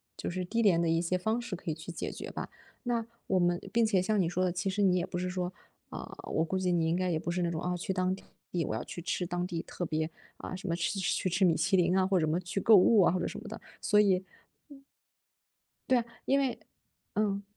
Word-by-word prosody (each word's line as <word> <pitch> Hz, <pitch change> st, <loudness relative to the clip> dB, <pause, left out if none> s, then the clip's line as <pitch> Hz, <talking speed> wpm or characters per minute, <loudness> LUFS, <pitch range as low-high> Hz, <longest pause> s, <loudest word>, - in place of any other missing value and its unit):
就 -, -, -4 dB
是 180 Hz, +1 st, -3 dB
低 230 Hz, +5 st, 0 dB
廉 185 Hz, -6 st, +5 dB
的 170 Hz, -, +1 dB
一 165 Hz, +1 st, +2 dB
些 180 Hz, +1 st, 0 dB
方 220 Hz, +6 st, 0 dB
式 215 Hz, -6 st, -4 dB
可 170 Hz, -, -4 dB
以 -, -, -1 dB
去 160 Hz, +3 st, -8 dB
解 -, -, -4 dB
决 -, -, -7 dB
吧。 -, -, -5 dB, 0.3 s
那 235 Hz, -2 st, 0 dB, 0.2 s
我 190 Hz, -1 st, +2 dB
们 175 Hz, 0 st, +2 dB
并 235 Hz, 0 st, +4 dB
且 195 Hz, -4 st, +3 dB
像 210 Hz, +2 st, +1 dB
你 170 Hz, -, +1 dB
说 185 Hz, +1 st, +1 dB
的， 180 Hz, -, +1 dB
其 185 Hz, +3 st, -2 dB
实 200 Hz, +2 st, -1 dB
你 185 Hz, -2 st, +4 dB
也 175 Hz, -, 0 dB
不 175 Hz, -, -5 dB
是 180 Hz, +1 st, -1 dB
说， 180 Hz, -1 st, -2 dB, 0.4 s
呃， -, -, -7 dB, 0.2 s
我 160 Hz, -, +2 dB
估 190 Hz, +3 st, -1 dB
计 180 Hz, -1 st, +1 dB
你 165 Hz, -2 st, +2 dB
应 165 Hz, -, +2 dB
该 185 Hz, 0 st, 0 dB
也 160 Hz, -, 0 dB
不 170 Hz, -, -3 dB
是 180 Hz, +1 st, -1 dB
那 170 Hz, -, +1 dB
种， 160 Hz, 0 st, -3 dB
啊， 180 Hz, 0 st, -1 dB
去 190 Hz, +2 st, -2 dB
当 185 Hz, 0 st, +1 dB
地 -, -, -15 dB, 0.4 s
我 -, -, -2 dB
要 110 Hz, -, -3 dB
去 175 Hz, -, -7 dB
吃 180 Hz, -, -1 dB
当 175 Hz, 0 st, -1 dB
地 170 Hz, -2 st, -3 dB
特 175 Hz, -, -5 dB
别， 155 Hz, 0 st, -1 dB, 0.3 s
呃， 185 Hz, -, -6 dB
什 195 Hz, 0 st, -7 dB
么 170 Hz, -, +1 dB
吃 175 Hz, +4 st, -1 dB
去 190 Hz, -1 st, 0 dB
吃 190 Hz, +2 st, +3 dB
米 170 Hz, -, +5 dB
其 195 Hz, -1 st, +2 dB
林 180 Hz, +1 st, +3 dB
啊， 190 Hz, -1 st, +3 dB
或 190 Hz, -1 st, +3 dB
什 155 Hz, -, +1 dB
么 160 Hz, +3 st, +1 dB
去 180 Hz, +2 st, -3 dB
购 220 Hz, +3 st, +7 dB
物 205 Hz, +2 st, +6 dB
啊 175 Hz, -, +4 dB
或 185 Hz, -, 0 dB
者 -, -, -1 dB
什 -, -, -6 dB
么 -, -, -10 dB
的， -, -, -7 dB, 0.2 s
所 210 Hz, -1 st, +4 dB
以 190 Hz, -2 st, +2 dB, 0.4 s
嗯。 275 Hz, -1 st, -14 dB, 1.1 s
对 255 Hz, -, +5 dB
啊， 230 Hz, -, -3 dB, 0.2 s
因 275 Hz, +1 st, +3 dB
为 265 Hz, -3 st, 0 dB, 0.5 s
嗯。 205 Hz, -1 st, 0 dB
185 Hz, 290 characters per minute, -31 LUFS, 175-195 Hz, 1.1 s, 购